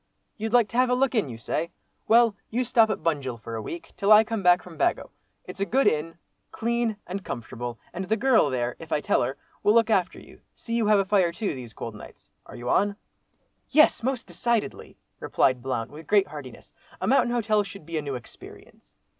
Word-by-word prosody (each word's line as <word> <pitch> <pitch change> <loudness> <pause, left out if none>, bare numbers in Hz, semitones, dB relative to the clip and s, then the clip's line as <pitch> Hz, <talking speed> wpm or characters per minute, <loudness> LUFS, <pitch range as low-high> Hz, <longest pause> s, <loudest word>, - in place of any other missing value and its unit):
You'd 220 0 -4
like 240 -2 +4
to 235 - -5
have 255 0 +4
a 250 - +3
look 265 +1 +1
in, 215 - +1
you 115 - -7
say? 155 +8 -2 0.4
Well, 230 -1 +5
you 245 +3 0
stop 225 -2 +4
at - - -3
Bunjil 140 -7 -1
for 115 - -8
a 110 - -3
week, 170 +10 -8
till 200 +1 +1
I 215 +1 +9
come 225 -1 -3
back 180 -1 +4
from 175 -2 -12
Bago; 150 - 0 0.3
it's 180 +1 -9
a - - +1
good 270 +3 +2
inn, 155 +2 0 0.3
clean 235 -1 -1
and 190 +2 -5
comfortable, 120 0 -6 0.2
and 185 +2 -4
the 220 - +2
girl 240 - +4
there, 125 -2 -2
if 165 0 -11
I - - +2
tell - - +1
her, 130 +3 -2 0.2
will 210 - +3
look 230 -1 +4
after 185 -4 +1
you; - - -16
see 230 - -7
you 230 -2 +1
have 210 -1 +5
a 195 - +2
fire 190 -3 +2
too, 200 +2 -3
these 125 -4 -9
cold 115 - -6
nights. 105 - -14 0.2
Are - - -11
you 120 - -7
on?" 200 +8 +2 0.7
"Yes! 305 -2 +5
most 255 0 -2
decidedly," 215 +6 -2 0.2
replied 130 -2 +1
Blount, 120 -3 -3
with 155 +2 -11
great 205 -2 +4
heartiness. 135 -5 -10 0.3
"A - - -2
mountain 260 -2 +3
hotel 220 -3 +2
should 195 -4 -9
be 165 -1 -3
a - - -3
new 140 -2 -4
experience." 120 - -13
195 Hz, 220 wpm, -26 LUFS, 145-225 Hz, 0.7 s, I